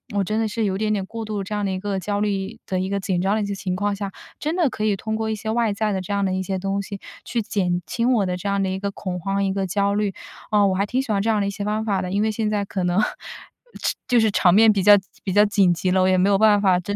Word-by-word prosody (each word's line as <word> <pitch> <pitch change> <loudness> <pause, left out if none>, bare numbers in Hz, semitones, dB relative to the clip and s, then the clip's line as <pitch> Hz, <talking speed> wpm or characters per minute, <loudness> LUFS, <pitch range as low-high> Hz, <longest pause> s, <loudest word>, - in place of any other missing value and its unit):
我 200 - +2
真 215 +3 -1
的 225 - +1
是， 215 +1 -1
有 190 -1 -1
点 215 0 0
点 195 -2 -1
过 225 -1 -6
度 210 -2 -3
这 210 +2 -4
样 205 -1 -1
的 195 - -1
一 185 - -3
个 200 -1 -2
焦 205 +2 -2
虑 195 -2 -2
的、 185 -1 -1
一 190 +1 -2
个 200 0 -1
紧 185 -2 -1
张 195 +2 +1
的 220 - 0
一 - - -1
些 200 0 -3
情 185 -2 -3
况 205 +1 -1
下， 200 -1 -5 0.3
真 310 +3 -2
的 335 -7 +2
可 215 - -5
以 210 -2 +2
通 220 +3 -4
过 220 0 -2
一 - - -1
些 220 +1 -6
外 225 -2 +1
在 210 +1 -1
的 190 - -1
这 200 +2 -4
样 200 0 0
的 190 - 0
一 190 0 -1
些 190 -1 -3
东 195 +1 -1
西， 200 0 -7 0.3
去 235 -2 -1
减 180 -4 -1
轻 245 +6 +1
我 215 -4 +2
的 180 0 -2
这 190 - -5
样 200 0 +1
的 190 - 0
一 190 - -2
个 200 0 -3
恐 185 -2 -5
慌、 195 +2 -1
一 195 - 0
个 195 0 -1
焦 200 +2 0
虑， 205 -2 0 0.4
啊， 205 -1 +4
我 190 - +1
还 200 +2 +1
挺 255 +5 0
喜 240 - -4
欢 200 - +2
这 220 - -2
样 215 -2 +2
的 200 - 0
一 - - 0
些 200 0 -5
方 215 +1 -1
法 195 -3 0
的。 180 - -4
因 200 +1 +1
为 220 0 +1
现 215 0 -2
在 205 -1 0
可 190 -2 -3
能 180 +3 +1 0.8
吃 - - 0
就 245 -1 +4
是 220 -2 +3
场 180 -3 +4
面 220 +2 +7
比 195 - 0
较 205 0 +8 0.3
比 190 - -2
较 205 +2 +5
紧 200 -3 +3
急 180 +2 -1
了， 185 0 +3
我 185 - +3
也 185 - +3
没 185 +2 +3
有 200 - +4
办 210 -2 +5
法 185 -3 +3
真 205 +3 -4
200 Hz, 355 characters per minute, -22 LUFS, 190-215 Hz, 0.8 s, 较